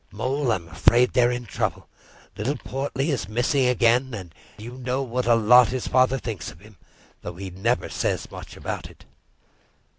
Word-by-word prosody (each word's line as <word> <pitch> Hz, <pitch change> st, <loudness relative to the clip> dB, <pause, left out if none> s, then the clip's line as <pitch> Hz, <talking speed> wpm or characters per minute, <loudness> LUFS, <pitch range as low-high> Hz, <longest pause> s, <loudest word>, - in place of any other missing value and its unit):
Mole, 130 Hz, +5 st, -1 dB
I'm 85 Hz, -5 st, -2 dB
afraid 120 Hz, +8 st, +3 dB
they're 120 Hz, -2 st, +4 dB
in 120 Hz, 0 st, -3 dB
trouble. -, -, -3 dB, 0.5 s
Little 130 Hz, +8 st, -2 dB
Portly 135 Hz, +3 st, -3 dB
is 115 Hz, -9 st, -2 dB
missing 125 Hz, +4 st, +1 dB
again; 125 Hz, +1 st, +2 dB
and 90 Hz, -5 st, -9 dB, 0.2 s
you 120 Hz, +4 st, -9 dB
know 130 Hz, +2 st, -1 dB
what 125 Hz, -1 st, -2 dB
a 120 Hz, -, +6 dB
lot 120 Hz, +2 st, +6 dB
his 125 Hz, +2 st, -3 dB
father 130 Hz, +1 st, +3 dB
thinks 110 Hz, -9 st, -5 dB
of 80 Hz, -, -14 dB
him, 105 Hz, 0 st, -17 dB, 0.4 s
though 85 Hz, -, -7 dB
he 95 Hz, +1 st, -7 dB
never 115 Hz, +7 st, 0 dB
says -, -, -2 dB
much -, -, -10 dB
about -, -, -5 dB
it." -, -, -18 dB
120 Hz, 175 wpm, -24 LUFS, 105-130 Hz, 0.5 s, a